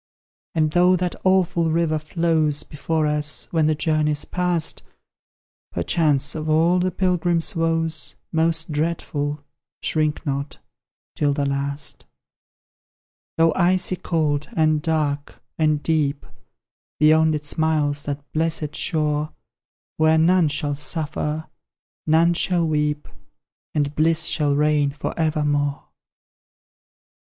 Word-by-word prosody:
And 155 -1 +2
though 180 +2 +4
that 180 -1 -1
awful 180 -3 +2
river 160 -1 +1
flows 155 -2 0
Before 155 +2 -2
us, 150 -3 -1
when 160 -2 +2
the 155 - +2
journey's 150 -1 0
past, 180 -3 -1 0.9
Perchance 145 - +1
of 155 0 -4
all 165 +4 +3
the 185 +1 +1
pilgrim's 175 -2 0
woes 165 -1 0 0.2
Most 160 0 +1
dreadful 150 -2 -2 0.4
shrink 155 0 0
not 140 0 -3 0.6
'tis 145 -1 +1
the 140 -1 0
last! 140 +1 -3 1.3
Though 165 -1 +4
icy 185 +1 +1
cold, 155 -4 -1
and 155 -2 +2
dark, 150 -3 -2 0.2
and 155 -1 +2
deep; 150 -3 0 0.7
Beyond 155 +1 +4
it 150 0 -5
smiles 150 -2 +1
that 145 0 -4
blessed 160 -1 -1
shore, 150 -1 0 0.7
Where 155 0 +4
none 170 +1 +4
shall 145 0 -1
suffer, 150 +1 -3 0.6
none 165 +2 +4
shall 170 -1 +1
weep, 150 -1 -1 0.7
And 145 -1 0
bliss 160 +1 +2
shall 145 -3 +1
reign 150 -1 +2
for 145 +2 -5
evermore! 150 -3 -1
155 Hz, 110 wpm, -22 LUFS, 150-165 Hz, 1.3 s, though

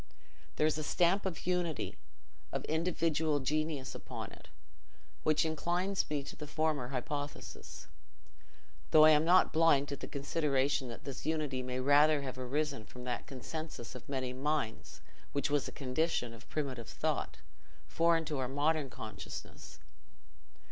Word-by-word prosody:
There 150 - +3
is 155 0 +2
a - - -2
stamp 180 +5 +3
of 170 -4 -5
unity, 175 -4 0 0.6
of - - -2
individual 160 -2 +1
genius 150 0 -1
upon - - -6
it, - - -14 0.7
which 155 +1 +3
inclines 175 +5 0
me 145 -2 -1
to - - -8
the 150 - -7
former 155 -4 0
hypothesis, 145 +2 -5 1.0
though 155 0 +8
I 155 - +9
am 150 0 +5
not 180 +3 +5
blind 155 -3 +5
to 140 - -2
the - - -7
consideration 140 -2 +1
that 115 - -8
this 140 +1 -6
unity 150 -5 0
may 125 0 -3
rather 145 +2 +5
have 130 -1 -5
arisen 140 0 -1
from 125 +3 -11
that 125 -1 -3
consensus 145 0 -6
of 125 0 -10
many 130 -2 -2
minds 135 -4 -2 0.3
which 140 0 0
was 145 -2 +2
a - - -6
condition 130 -2 -1
of 115 +2 -14
primitive 135 -7 -3
thought, - - -1 0.5
foreign 165 -1 +3
to 150 -3 -2
our 125 -1 -1
modern 145 +1 +1
consciousness. 110 -4 -8
145 Hz, 150 wpm, -33 LUFS, 130-160 Hz, 1.0 s, I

